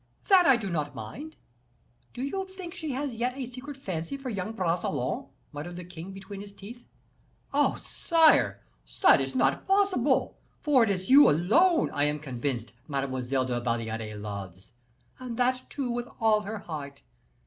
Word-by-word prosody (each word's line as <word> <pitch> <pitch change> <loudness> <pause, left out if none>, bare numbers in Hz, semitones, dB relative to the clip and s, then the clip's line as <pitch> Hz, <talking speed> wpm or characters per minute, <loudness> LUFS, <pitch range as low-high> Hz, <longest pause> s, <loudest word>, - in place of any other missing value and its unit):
"That 370 -3 +7
I 270 - +7
do 210 -5 -4
not 150 -3 -2
mind. 285 - -8 0.8
Do 250 - -6
you 380 +8 -3
think 375 -2 -9
she 310 -4 -4
has 275 0 -3
yet 245 +3 -2
a 265 - -3
secret 260 +3 -9
fancy 185 -1 -4
for 270 -2 -5
young 200 0 -3
Bragelonne?" 170 - -1 0.2
muttered 155 +4 -7
the 180 - -7
king 175 +1 -9
between 195 +1 -9
his 200 0 -9
teeth. 220 +5 -11 0.7
"Oh! 290 +1 +3
sire, 310 - +3 0.4
that - - +7
is 135 0 -4
not 135 +1 +1
possible; 385 -10 +2 0.2
for 280 -5 +4
it 225 - +1
is 190 +2 -2
you 285 +2 +9
alone, 310 - +3
I 145 - +1
am 150 0 0
convinced, 125 -5 -4
Mademoiselle 135 -2 -1
de 125 - -2
la 120 - 0
Valliere 115 -2 -3
loves, 100 -3 -7 0.5
and 245 -3 -6
that, 255 +1 +1
too, 265 -4 -3
with 240 0 -3
all 220 -1 +4
her 215 +2 -5
heart. 145 -7 -7
195 Hz, 170 wpm, -28 LUFS, -, 0.8 s, you